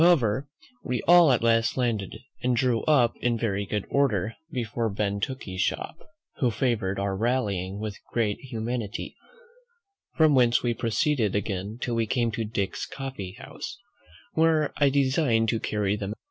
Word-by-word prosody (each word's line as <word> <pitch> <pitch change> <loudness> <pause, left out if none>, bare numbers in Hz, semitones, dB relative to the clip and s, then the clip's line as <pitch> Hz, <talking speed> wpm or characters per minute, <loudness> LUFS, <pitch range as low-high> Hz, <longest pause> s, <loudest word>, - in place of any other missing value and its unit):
However, 140 -6 +3 0.3
we 125 -2 -2
all 175 -3 +7
at 120 -2 +2
last 115 0 +2
landed, 110 -6 -1 0.2
and 125 0 +1
drew 120 -2 +2
up 125 -7 +4
in 120 -1 0
very 100 -3 -1
good 105 -1 -2
order 115 -7 +1 0.2
before 115 -3 -2
Ben 100 0 -1
Tooke's 100 -5 -4
shop, - - -1 0.4
who 125 - +2
favoured 110 -4 0
our 100 0 -1
rallying 100 -4 -1
with 105 -2 -5
great 110 -4 0
humanity; 115 -3 -4 1.0
from 155 -2 +5
whence 120 -3 +4
we 120 -1 +1
proceeded 115 -1 0
again 100 +1 -2
till 120 - -2
we 115 -1 0
came 120 0 +1
to 115 +1 -2
Dick's 105 -3 -3
coffee 130 -9 -6
house, - - -8 0.6
where 160 -2 +3
I 145 -1 +4
designed 130 -4 +2
to 115 - 0
carry 105 -2 0
them. 100 0 -4
115 Hz, 155 wpm, -26 LUFS, 105-130 Hz, 1.0 s, all